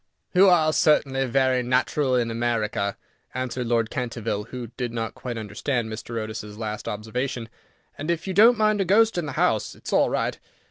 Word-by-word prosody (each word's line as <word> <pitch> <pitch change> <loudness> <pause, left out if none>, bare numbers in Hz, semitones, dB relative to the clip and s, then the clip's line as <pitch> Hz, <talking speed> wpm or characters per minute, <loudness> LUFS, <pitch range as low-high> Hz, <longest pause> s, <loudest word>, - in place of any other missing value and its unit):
"You 190 +1 +7
are 160 -3 +4
certainly 135 -4 +2
very 130 0 +2
natural 130 +2 +1
in 120 -2 +1
America," 110 -4 -1 0.4
answered 130 -1 -3
Lord 115 -1 +1
Canterville, 115 -5 -3
who 120 -1 -7
did 125 -1 -3
not 115 -1 -3
quite 120 -2 -6
understand 110 +2 -2
Mr. 115 +1 -6
Otis's 110 -1 -6
last 110 -1 -5
observation, 115 +2 -3 0.5
"and 150 +3 -4
if 170 -1 -1
you 190 - -3
don't 225 +5 +6
mind 215 -1 +2
a - - +1
ghost 220 +4 +4
in 160 - -3
the - - -5
house, - - +1
it - - -21
is - - -4
all - - +4
right. - - -1
125 Hz, 185 wpm, -24 LUFS, 115-145 Hz, 0.5 s, You